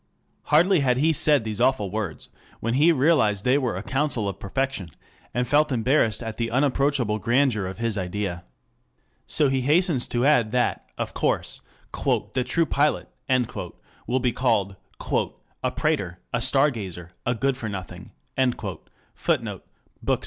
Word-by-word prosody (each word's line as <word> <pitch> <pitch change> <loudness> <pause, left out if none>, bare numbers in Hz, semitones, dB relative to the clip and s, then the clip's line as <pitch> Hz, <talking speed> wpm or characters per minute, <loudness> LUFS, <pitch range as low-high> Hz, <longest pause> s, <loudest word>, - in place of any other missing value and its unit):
Hardly 175 +4 +4
had 125 -3 +2
he 160 +4 +3
said 145 -3 +3
these 110 0 -3
awful 120 -7 +2
words, 105 -6 -4 0.3
when 115 +1 -1
he 150 +6 +5
realized 130 - +2
they 130 +3 +4
were 125 -8 -1
a 95 - -5
counsel 135 -4 0
of 100 - -4
perfection, 130 -3 -2 0.4
and 125 +1 -1
felt 150 +3 +3
embarrassed 120 -3 +2
at 115 -1 -5
the 115 -1 -1
unapproachable 135 -3 +1
grandeur 120 -4 +2
of 95 - -6
his 115 -2 -1
idea. 90 -1 -3 0.8
So 150 - +3
he 135 -1 +1
hastens 150 0 +2
to 120 +1 0
add 125 -7 +4
that, 125 -1 0
of - - -3
course, - - 0 0.3
"the 130 - 0
true 165 +7 +2
pilot" 150 0 +1 1.0
will 130 +2 +1
be 125 -2 0
called 105 -6 +1 0.9
"a - - +2
prater, 90 -3 -1 0.2
a 120 - +1
star 140 +4 +4
gazer, 90 -7 -7
a 120 - 0
good 135 +3 +1
for 115 -4 -5
nothing." 95 -4 -7 1.0
[Footnote: - - -2 0.4
2 - - -12
Bk. - - +2
125 Hz, 155 wpm, -25 LUFS, 105-140 Hz, 1.0 s, he